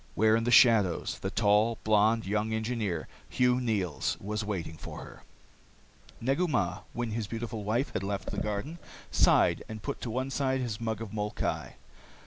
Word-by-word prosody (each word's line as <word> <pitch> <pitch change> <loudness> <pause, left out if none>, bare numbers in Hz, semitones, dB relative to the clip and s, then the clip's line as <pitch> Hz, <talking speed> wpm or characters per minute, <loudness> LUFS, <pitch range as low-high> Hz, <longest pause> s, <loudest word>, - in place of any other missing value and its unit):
Where 110 +3 +4
in 115 0 0
the - - +1
shadows 115 -8 +4
the 95 - -3
tall, 105 +2 +3
blonde 110 +1 +3
young 105 +3 -1
engineer, 110 -6 -2 0.2
Hugh 125 0 +2
Neils, 100 -10 -1
was 105 +2 -3
waiting 90 -6 -4
for - - -8
her.... - - -12 1.0
Negu 135 +9 +1
Mah, 90 - 0
when 120 -2 -3
his 110 -1 -2
beautiful 115 -1 -5
wife 115 +7 -1
had - - -1
left 100 0 -3
the - - -2
garden, 105 +11 -3 0.3
sighed - - +4
and 110 -1 -7
put 140 - -4
to 120 - -4
one 130 +4 -2
side 130 -1 0
his 115 -4 -3
mug 110 -1 -2
of 115 - -6
molkai. 105 -1 -3
110 Hz, 170 wpm, -29 LUFS, 105-120 Hz, 1.0 s, Where